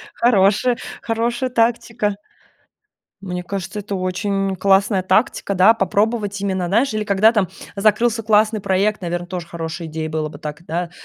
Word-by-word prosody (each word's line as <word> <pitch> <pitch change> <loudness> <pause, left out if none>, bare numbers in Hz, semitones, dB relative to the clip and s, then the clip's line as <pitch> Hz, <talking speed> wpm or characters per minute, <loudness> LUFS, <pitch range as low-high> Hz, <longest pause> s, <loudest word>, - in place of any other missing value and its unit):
Хорошая, 230 +1 +3 0.2
хорошая 235 +3 -1
тактика. 230 -3 0 1.1
Мне 180 -2 -4
кажется, 195 +2 -5
это 205 0 -5
очень 195 +1 -1
классная 195 +1 +3
тактика, 200 +1 +1
да, 190 +4 +6
попробовать 205 0 0
именно, 190 -2 -1
знаешь, 230 +8 +2
или 215 0 -1
когда 210 +2 +4
там 205 -6 +1 0.3
закрылся 220 +3 +2
классный 215 0 +3
проект, 200 +3 +1
наверно, 175 -1 -3
тоже 180 -2 -5
хорошая 165 0 -6
идея 160 0 -4
было 155 -1 -2
бы 145 - -11
так, 150 +1 -7
да. 170 +2 -3
200 Hz, 145 wpm, -20 LUFS, 180-220 Hz, 1.1 s, да